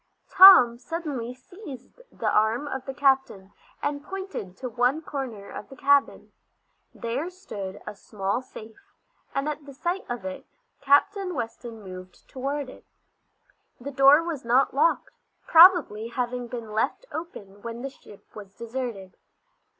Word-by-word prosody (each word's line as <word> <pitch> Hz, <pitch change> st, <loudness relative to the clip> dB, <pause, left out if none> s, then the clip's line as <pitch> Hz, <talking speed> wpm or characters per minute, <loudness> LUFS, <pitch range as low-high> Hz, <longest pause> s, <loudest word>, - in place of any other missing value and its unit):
Tom 305 Hz, -12 st, +9 dB
suddenly 270 Hz, -4 st, -5 dB
seized 300 Hz, -, -12 dB
the -, -, -4 dB
arm 220 Hz, +7 st, +1 dB
of 265 Hz, -2 st, -6 dB
the 270 Hz, -, -4 dB
captain, 265 Hz, -9 st, +1 dB, 0.3 s
and 285 Hz, 0 st, -2 dB
pointed 380 Hz, -, -7 dB
to 260 Hz, -, -5 dB
one 250 Hz, +6 st, 0 dB
corner 245 Hz, -10 st, -6 dB
of 200 Hz, -, -9 dB
the 270 Hz, -, -12 dB
cabin. 280 Hz, 0 st, +1 dB, 0.6 s
There 255 Hz, +9 st, -4 dB
stood 205 Hz, -, -8 dB
a 210 Hz, -, -6 dB
small 200 Hz, +2 st, -3 dB
safe, 255 Hz, -, -14 dB, 0.4 s
and 275 Hz, +2 st, -1 dB
at 300 Hz, 0 st, -4 dB
the 280 Hz, -, -11 dB
sight 350 Hz, +7 st, -2 dB
of 240 Hz, -5 st, -5 dB
it 185 Hz, -, -7 dB, 0.3 s
Captain 365 Hz, +7 st, +2 dB
Weston 230 Hz, -2 st, -6 dB
moved 185 Hz, -1 st, -11 dB
toward 275 Hz, +2 st, -4 dB
it. 255 Hz, -, -14 dB, 0.9 s
The 275 Hz, +4 st, -7 dB
door 275 Hz, +4 st, +6 dB
was 330 Hz, -5 st, -5 dB
not 245 Hz, +3 st, +2 dB
locked, 295 Hz, +5 st, +1 dB, 0.3 s
probably 325 Hz, -, +6 dB
having 245 Hz, 0 st, -3 dB
been 235 Hz, -3 st, -7 dB
left 220 Hz, -, -1 dB
open 205 Hz, -, -8 dB
when 235 Hz, +2 st, -7 dB
the 275 Hz, -, -5 dB
ship 205 Hz, -6 st, -17 dB
was 200 Hz, -2 st, -11 dB
deserted. 230 Hz, -5 st, -6 dB
255 Hz, 140 wpm, -25 LUFS, 220-290 Hz, 0.9 s, Tom